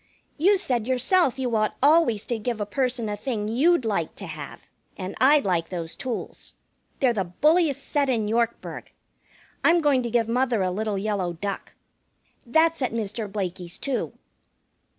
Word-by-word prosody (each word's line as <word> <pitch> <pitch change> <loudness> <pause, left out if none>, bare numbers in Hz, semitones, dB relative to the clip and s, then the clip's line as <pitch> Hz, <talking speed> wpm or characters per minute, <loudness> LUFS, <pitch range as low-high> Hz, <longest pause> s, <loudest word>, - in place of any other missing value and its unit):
"You 390 +6 +5
said 245 - -1
yourself 265 +3 +2
you 250 -3 -1
ought 215 -1 0
always 290 -8 +4
to 235 -2 -2
give 230 +1 -3
a 205 - -1
person 250 +1 -1
a 210 - -2
thing 210 -2 -3
you'd 270 +6 +3
like 195 -7 -1
to 200 - -8
have, 155 -4 -8 0.3
and 185 -1 -5
I'd 285 +1 +5
like 170 -3 0
those 170 -3 -5
tools. 255 -3 -6 0.4
They're 255 -3 +3
the 195 -4 -1
bulliest 300 - +2
set 285 -2 +1
in 225 -4 +1
Yorkburg. 235 +1 -2 0.7
I'm 340 +1 +5
going 290 -5 +3
to 240 - -3
give 230 -1 +1
mother 240 -3 +1
a 185 - 0
little 210 +1 -2
yellow 195 -3 -1
duck. 195 +4 -5 0.7
That's 320 +4 +3
at 250 -3 -1
Mr. 215 -1 -3
Blakey's, 180 -3 -4
too." 275 -3 -2
230 Hz, 165 wpm, -25 LUFS, 205-270 Hz, 0.7 s, You